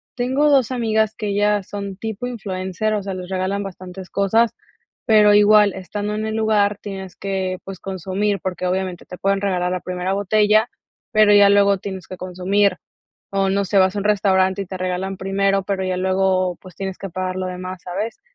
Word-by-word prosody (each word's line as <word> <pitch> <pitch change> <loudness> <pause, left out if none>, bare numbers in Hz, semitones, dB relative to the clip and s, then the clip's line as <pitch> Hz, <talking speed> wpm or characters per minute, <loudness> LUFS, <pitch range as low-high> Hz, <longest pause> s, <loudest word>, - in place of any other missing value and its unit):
tengo 265 +4 +1
2 265 -3 +3
amigas 220 -3 +1
que 215 -1 -5
ellas 205 -1 +1
son 200 -1 -5
tipo 220 +2 -5
influencer, 200 -2 -3
o 205 - -2
sea, 195 -1 -4
les 185 0 -7
regalan 190 +2 -1
bastantes 185 -1 -8
cosas, 220 +4 +2 0.5
pero 210 -2 +6
igual 210 -1 +6
estando 205 +3 -4
en 215 0 -2
el 220 0 -3
lugar 210 -2 +2
tienes 190 -3 -7
que, 190 -2 -3
pues, 195 -2 -8
consumir, 195 +2 -2
porque 185 -1 -3
obviamente 185 -1 -2
te 180 - -10
pueden 195 0 +1
regalar 180 -2 0
la 185 - -2
primera 185 +1 -3
botella, 210 +3 +3 0.4
pero 215 -1 +5
ya 205 -1 +7
luego 200 -1 +4
tienes 190 -1 -7
que 185 - -8
consumir. 185 +1 0 0.6
O 195 -1 +1
no 200 +1 +1
sé, 195 +1 +1
vas 190 0 +4
a 205 - -2
un 200 - -5
restaurante 195 -2 +2
y - - -9
te 185 - -6
regalan 185 +1 -3
primero, 195 +1 +1
pero 190 -1 -2
ya 185 -1 -1
luego, 185 -1 +1
pues, 185 -2 -14
tienes 190 -1 -5
que 195 - -6
pagar 185 +1 -3
lo 185 0 -2
demás, 185 0 -6
¿sabes? 210 - -4
195 Hz, 195 wpm, -21 LUFS, 185-205 Hz, 0.6 s, ya